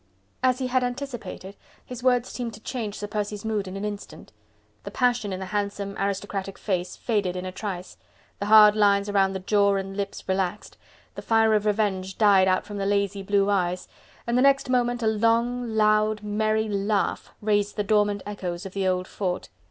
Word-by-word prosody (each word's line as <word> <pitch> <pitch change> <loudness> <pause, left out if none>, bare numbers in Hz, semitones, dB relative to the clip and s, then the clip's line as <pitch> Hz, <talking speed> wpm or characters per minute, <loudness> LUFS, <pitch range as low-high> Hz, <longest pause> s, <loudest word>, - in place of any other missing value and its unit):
As 255 -1 +3
he 260 - -2
had 255 0 +1
anticipated, 245 -6 -5 0.3
his 250 -1 -8
words 250 -1 +2
seemed 235 -3 -5
to - - -13
change 220 -2 -4
Sir 205 - -4
Percy's 210 0 -4
mood 210 -3 -1
in 185 +1 -6
an 200 - -4
instant. 205 -1 -7 0.5
The - - -6
passion 245 -5 +1
in 185 - -4
the 190 - -4
handsome, 200 0 -3
aristocratic 195 0 -3
face 180 -3 -2
faded 205 -6 -1
in 180 0 -4
a 185 - -4
trice, 185 -2 -6 0.4
the 200 - -3
hard 210 -1 +8
lines 205 -1 +3
round 195 -1 +2
the - - -2
jaw 200 +1 +2
and 195 0 -4
lips 200 0 -5
relaxed, 190 +1 -2 0.4
the - - -7
fire 225 -1 +3
of 210 0 +1
revenge 195 -3 0
died 200 -3 +5
out 185 0 +1
from 205 0 -7
the 195 0 -1
lazy 200 -1 0
blue 200 0 +2
eyes, 180 -2 0 0.4
and 235 - -1
the 250 - +4
next 275 -1 +3
moment 245 -1 +1
a - - +2
long, 230 +3 +1
loud, 215 0 +2
merry 215 +1 0
laugh 200 0 -1
raised 205 -1 0
the 210 - -1
dormant 205 -1 +1
echoes 185 -4 -5
of 190 - -7
the 195 -1 -1
old 185 0 0
fort. 180 -3 -3
205 Hz, 190 wpm, -25 LUFS, 195-220 Hz, 0.5 s, hard